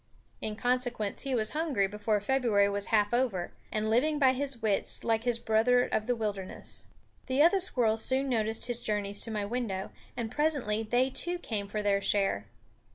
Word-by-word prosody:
In 215 - -3
consequence 245 -3 0
he 270 -2 -1
was 215 -2 +1
hungry 300 -10 0
before 210 +1 -1
February 215 -3 +2
was 200 0 -2
half 210 0 +2
over, 235 -8 0 0.2
and 215 0 -1
living 270 +8 +2
by 265 -3 +4
his 270 -2 -2
wits, 215 -3 0
like 225 0 0
his 240 -2 +2
brother 235 +2 +3
of 215 - -2
the 245 - +1
wilderness. 205 -4 -5 0.4
The 265 +3 +3
other 350 +4 +4
squirrels 230 -11 +2
soon 265 +1 +2
noticed 225 -3 +1
his 240 -1 0
journeys 205 -3 -1
to - - -1
my 210 -2 -2
window, 205 -4 -3 0.3
and 225 -2 -3
presently 275 -7 0
they 245 +4 +1
too 350 +6 +1
came 215 - -4
for 210 +1 -3
their 200 -1 +2
share. 195 - 0
225 Hz, 180 wpm, -29 LUFS, 210-255 Hz, 0.4 s, by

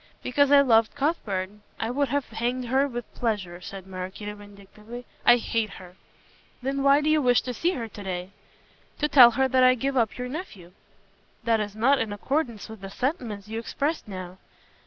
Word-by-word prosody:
"Because 285 +2 +2
I 285 -1 +8
loved 230 -3 +3
Cuthbert. 215 - -1 0.3
I 225 - -1
would 280 +2 +1
have 285 -2 0
hanged 245 +3 -2
her 270 +3 +3
with 240 -3 -7
pleasure," 195 -7 -3
said 195 0 -8
Maraquito 190 +2 -6
vindictively. 205 +3 -12 0.2
"I 240 - +8
hate 225 -3 -2
her!" 180 -1 -13 0.7
"Then 275 +1 -1
why 280 +1 +5
do 300 - +1
you 310 -1 +3
wish 245 -2 +4
to 250 - -4
see 345 +9 0
her 235 -7 -4
to 205 - -10
day?" 185 -1 -5 0.7
"To 295 - +1
tell 265 -5 +9
her 265 0 +3
that 260 0 +3
I 255 0 +6
give 270 +3 -2
up 230 -4 +1
your 250 0 -4
nephew." 250 - -8 0.7
"That 230 -1 +2
is 205 -1 -4
not 265 +6 +3
in 215 - -2
accordance 235 +1 -2
with 220 -2 -11
the 195 - -7
sentiments 225 - -3
you 225 +1 -4
expressed 285 +6 -2
now." 185 -2 -8
235 Hz, 190 wpm, -26 LUFS, 205-270 Hz, 0.7 s, tell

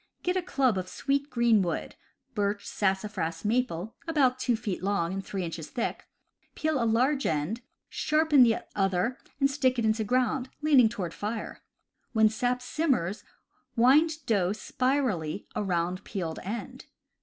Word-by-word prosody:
Get 360 +1 0
a 370 - +1
club 265 - +1
of 185 0 -6
sweet 280 +5 -1
green 235 -4 +3
wood 175 -2 -2 0.4
(birch, 205 0 -1
sassafras, 190 -4 -1
maple), 220 -4 0
about 265 -6 +2
two 245 -2 +1
feet 215 -6 -4
long 190 -3 0
and 195 0 -3
three 190 -1 -4
inches 165 -2 -5
thick, 240 - -3 0.5
peel 310 -5 0
large 260 +5 +2
end, 160 +10 -1 0.3
sharpen 305 -2 +3
the 230 -2 +4
other 195 +4 0 0.2
and 275 - +5
stick 270 -2 +1
it 235 - +1
into 220 0 +2
ground, 250 +3 0
lean 300 -3 +6
ing 230 -3 +6
toward 175 -6 -4
fire. 215 +2 -5 0.5
When 220 -1 +5
sap 245 +3 -1
simmers 250 - 0 0.5
wind 295 +5 +4
dough 195 -4 +2
spirally 215 - -1
around 180 -2 -1
peeled 170 -6 -4
end. 215 +5 -6
225 Hz, 145 wpm, -28 LUFS, 190-260 Hz, 0.5 s, lean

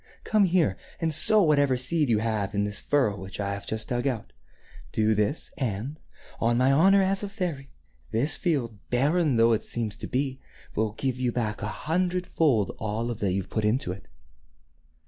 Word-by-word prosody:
Come 215 -2 +3
here 170 - +2 0.2
and 160 -1 0
sow 210 +7 +6
whatever 145 -5 +3
seed 150 +3 0
you 110 - +3
have 105 -2 -1
in 100 - +1
this 105 0 -3
furrow 130 -8 +1
which 95 0 -8
I 100 -1 -1
have 100 - -7
just 110 0 -3
dug 120 +2 0
out. 120 -6 -3 0.6
Do 110 0 +2
this, 105 +8 -1
and, 130 +4 -3 0.4
on 120 +1 +2
my 130 +2 +4
honor 190 +7 +5
as 195 +1 +1
a 205 - -4
fairy, 165 -8 -4 0.4
this 135 +8 0
field, 125 - -1
barren 145 +3 +2
though 115 0 +5
it 110 - +1
seems 110 -3 -2
to - - -5
be, 135 0 -2 0.3
will 110 -1 -1
give 130 +1 -2
you 125 -1 +1
back 110 -3 -2
a 105 - -2
hundred 180 +9 -1
fold 130 - +2
of - - -18
all 115 +2 -2
that 105 -4 -1
you 95 +1 -1
put 110 +4 -3
into 105 -1 +1
it." 95 - -9
125 Hz, 190 wpm, -26 LUFS, 110-155 Hz, 0.6 s, sow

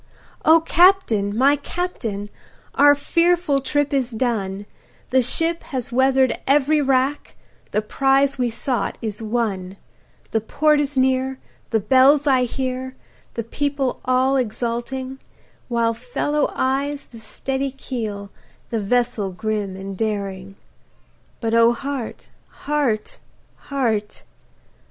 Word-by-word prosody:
O 320 +1 +6
CAPTAIN! 325 - +3
my 275 +4 +5
Captain, 235 - -4 0.4
our 290 +1 +6
fearful 335 -1 +2
trip 290 +2 0
is 265 -3 +1
done, 215 -5 -2 0.5
The 260 0 +4
ship 330 +7 +1
has 255 -3 -4
weather'd 265 +1 +3
every 295 +2 +3
rack, 270 +1 0 0.3
the 210 +1 -1
prize 270 +4 +2
we 245 -1 +1
sought 230 -1 -2
is 215 -1 -4
won, 210 -5 -2 0.5
The 220 - +1
port 300 +7 +2
is 285 -1 -2
near, 260 0 +1 0.3
the 225 - +2
bells 265 +7 +5
I 260 -3 +3
hear, 260 +1 -4 0.4
the 230 - -2
people 280 +2 -2
all 260 +1 +2
exulting, 250 +3 -3 0.5
While 235 -2 +1
follow 295 - -1
eyes 280 +2 -1
the 230 - -13
steady 270 +5 -3
keel, 220 -7 -5 0.4
the 230 - 0
vessel 235 -1 0
grim 205 0 -3
and 195 0 -7
daring; 195 -2 -3 0.8
But 225 -1 -2
O 230 +1 +5
heart! 270 -1 -5 0.2
heart! 280 -8 -2 0.4
heart! 225 -7 -2
255 Hz, 120 wpm, -21 LUFS, 220-275 Hz, 0.8 s, O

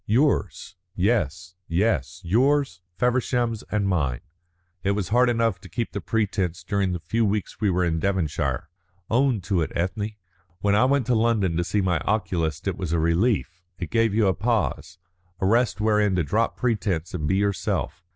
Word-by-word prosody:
"Yours. 120 - +1 0.2
Yes 90 - 0
yes, 90 - 0
yours, 125 0 +2 0.2
Feversham's, 120 -1 +1
and 105 -2 0
mine. 70 -10 0 0.6
It 100 +2 +1
was 100 -3 -2
hard 125 +3 +4
enough 115 -5 +1
to - - -12
keep 120 -2 -3
the 100 - -4
pretence 95 -6 -1
during 100 +1 0
the 90 - -2
few 110 +8 -1
weeks 105 -1 -2
we 105 - +3
were 90 -1 +1
in 80 -1 0
Devonshire. 95 -5 -1 0.4
Own 125 -2 +2
to 90 -1 0
it, 75 - -2
Ethne! 100 +5 -2 0.5
When 100 0 +1
I 110 +5 +4
went 135 -1 +2
to 125 - +1
London 110 -6 +2
to 85 - +1
see 100 +4 0
my 90 -3 +1
oculist 90 -4 -1
it 95 - -1
was 90 -4 -3
a 85 - +2
relief; 90 +2 +1 0.2
it - - -6
gave 115 -1 +3
you 110 -1 +3
a 95 - +3
pause, 105 -3 -1 0.4
a - - 0
rest 115 +3 +2
wherein 105 -2 +2
to 90 - +1
drop 110 +10 0
pretence 105 -9 -1
and 75 -5 -2
be 95 - +2
yourself. 100 -3 -1
100 Hz, 180 wpm, -24 LUFS, 90-115 Hz, 0.6 s, hard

